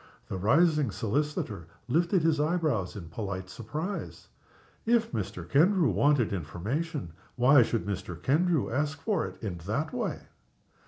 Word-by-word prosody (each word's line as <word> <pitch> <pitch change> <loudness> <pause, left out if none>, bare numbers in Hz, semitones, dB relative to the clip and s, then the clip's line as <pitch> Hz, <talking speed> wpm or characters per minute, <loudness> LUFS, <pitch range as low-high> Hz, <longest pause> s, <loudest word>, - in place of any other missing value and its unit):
The - - -3
rising 150 - +3
solicitor 110 - -2 0.2
lifted 170 +6 +2
his 160 -2 +3
eyebrows 150 - 0
in 85 -6 -8
polite 95 -1 -5
surprise. 155 - -5 0.5
If 230 -1 +2
Mr. 90 -6 -4
Kendrew 165 - +4
wanted 120 +2 +3
information, 100 - -3 0.2
why 130 +3 +6
should 115 -1 0
Mr. 90 -4 -4
Kendrew 155 - +2
ask 145 +4 -1
for 210 +5 0
it - - -12
in 90 -5 -4
that 145 +9 -1
way? - - -2
135 Hz, 130 wpm, -29 LUFS, 100-160 Hz, 0.5 s, why